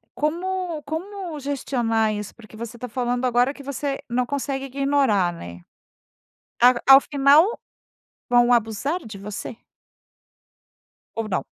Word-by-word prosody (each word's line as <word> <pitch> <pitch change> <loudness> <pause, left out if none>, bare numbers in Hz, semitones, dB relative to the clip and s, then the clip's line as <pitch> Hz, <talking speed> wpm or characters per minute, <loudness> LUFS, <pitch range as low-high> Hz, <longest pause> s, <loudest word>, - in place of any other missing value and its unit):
como 345 +1 -2
como 345 +1 -5
gestionar 240 -6 0
isso? 210 -1 -6
Porque 220 -2 -15
você 235 +1 -7
tá 250 - -6
falando 245 +1 -1
agora 250 +2 +2
que 280 - -12
você 280 0 -3
não 250 +1 0
consegue 275 0 -3
ignorar, 270 -9 +1
né? 85 - -10 1.0
Ao 250 +1 +7 0.2
ao - - +6
final 290 - +3 0.7
vão 245 0 +4
abusar 235 - 0
de 210 -2 -9
você? 210 +3 -7 1.6
Ou 225 -1 -3
não? 185 - -1
255 Hz, 125 wpm, -23 LUFS, 225-285 Hz, 1.6 s, Ao